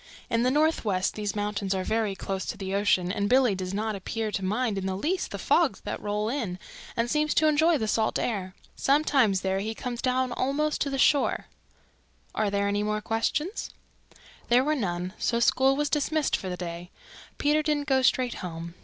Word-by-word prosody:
"In 230 - +2
the 250 - +3
Northwest 255 - +1
these 210 -1 -3
mountains 205 -2 -1
are 190 - -1
very 215 -1 0
close 190 -1 -4
to 225 - -4
the 195 -1 -4
ocean 195 -3 +2
and 205 0 -1
Billy 255 -4 +4
does 185 -1 -4
not 215 +2 -2
appear 215 +3 -3
to 195 - -3
mind 210 +1 0
in 190 - -3
the 190 0 -2
least 355 - -1
the - - -5
fogs - - +2
that - - -5
roll 210 +1 -1
in, 225 -8 -2 0.4
and 230 +1 +1
seems 300 +4 +1
to 310 - +4
enjoy 315 +2 +4
the 220 - -2
salt 220 +1 +1
air. 190 -5 -2 0.2
Sometimes 270 -9 +3
there 190 0 0
he 220 +3 -3
comes 245 0 -5
down 255 0 +1
almost 285 +5 -1
to 285 - +1
the 275 - -2
shore. 280 +1 +3 0.9
Are 215 -1 0
there 200 0 0
any 205 0 0
more 210 0 -1
questions?" 240 - -2 0.8
There 245 +2 +5
were 300 +2 +1
none, 180 -8 -2
so 235 - +1
school 265 +3 +4
was 295 +1 0
dismissed 300 0 +1
for 190 - -4
the 180 - -4
day. 175 0 -6 0.5
Peter 300 +1 +2
didn't 300 -1 0
go 265 -2 +3
straight 255 -1 +2
home. 170 -2 -6
220 Hz, 200 wpm, -27 LUFS, 195-270 Hz, 0.9 s, There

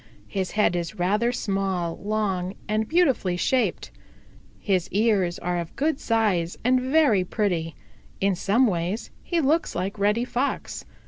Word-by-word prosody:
His 190 -2 -3
head 210 -4 +3
is 175 +5 -3
rather 210 +7 +1
small, 195 -7 -1
long 200 -3 -2
and 215 +1 0
beautifully 270 - +2
shaped. 255 +7 0 0.7
His 185 -4 0
ears 200 -4 +1
are 175 0 -2
of 170 -1 -6
good 305 0 0
size 205 -7 0
and 255 +2 +3
very 260 -7 +3
pretty. 175 -5 -1 0.4
In 195 0 +2
some 205 +8 +2
ways 180 +1 -2
he 345 - -1
looks 315 +3 +1
like 195 +3 -3
Reddy 210 +4 +2
Fox. 255 +3 -3
205 Hz, 140 wpm, -25 LUFS, 180-240 Hz, 0.7 s, head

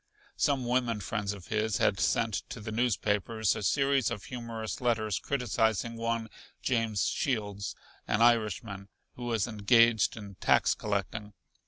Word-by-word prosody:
Some 135 -3 +1
women 120 -2 +1
friends 105 0 -2
of 100 -3 -10
his 110 -1 0
had - - +2
sent - - +1
to - - -6
the 105 +1 -6
newspapers 110 -2 +1
a - - -4
series 135 +3 +2
of 115 -4 -5
humorous 115 -1 -5
letters 110 -5 +1
criticizing 115 -3 0
one 115 0 -2 0.4
James 115 -5 +1
Shields, 105 - -2 0.3
an 105 - +1
Irishman, 110 -4 +1 0.2
who 120 - -7
was 115 -4 +1
engaged 115 +1 +4
in 100 -3 -9
tax - - +4
collecting. 105 0 -3
110 Hz, 140 wpm, -30 LUFS, 105-120 Hz, 0.4 s, engaged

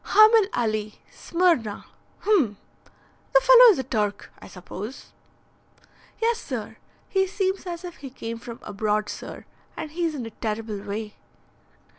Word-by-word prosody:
"'Hamil 430 -1 +6
Ali, 215 -2 -1 0.2
Smyrna.' 335 - 0 0.4
Hum! 310 - +2 0.8
The - - +10
fellow - - +8
is 415 - +4
a 265 - -1
Turk, 210 -4 -2
I - - -12
suppose." 200 +7 -9 1.1
"Yes, 460 0 +1
sir. - - -6 0.3
He 385 0 +1
seems 380 0 -2
as 345 0 -5
if 350 -1 -8
he 275 - -8
came 230 -3 -6
from 235 -1 -8
abroad, 210 +1 -1
sir. - - -8 0.3
And 305 - -5
he's 330 -1 -1
in 250 -5 -4
a 225 - -7
terrible 215 -1 -4
way." 210 +1 -6
245 Hz, 140 wpm, -25 LUFS, -, 1.1 s, The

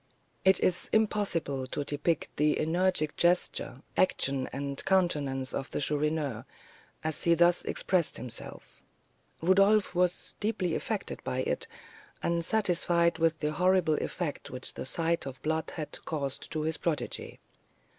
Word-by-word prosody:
It 190 -1 +5
is 180 - +1
impossible 185 -11 0
to 145 - -2
depict 145 +3 -1
the 150 +1 +3
energetic 160 -1 +1
gesture, 165 -6 +1
action, 140 -7 +2
and 140 0 -3
countenance 145 -8 +1
of 135 - -3
the - - -3
Chourineur, 150 -4 0 0.6
as 155 -1 -2
he 170 0 +5
thus 175 +1 +4
expressed 180 -4 0
himself. 120 -2 -8 0.6
Rodolph 195 +3 +4
was 180 0 0
deeply 205 -5 0
affected - - -3
by - - -1
it, - - -2 0.6
and 170 0 +1
satisfied 170 -4 +2
with 165 -1 +2
the 150 0 0
horrible 180 0 +3
effect 170 -5 -3
which 125 0 -6
the - - -6
sight 165 0 0
of 135 - -5
the - - -21
blood 160 0 -1
had 155 -3 -5
caused 140 -4 -4
to 155 -1 -1
his 160 +1 -1
protégé. 150 -7 -3
160 Hz, 140 wpm, -30 LUFS, 145-180 Hz, 0.6 s, It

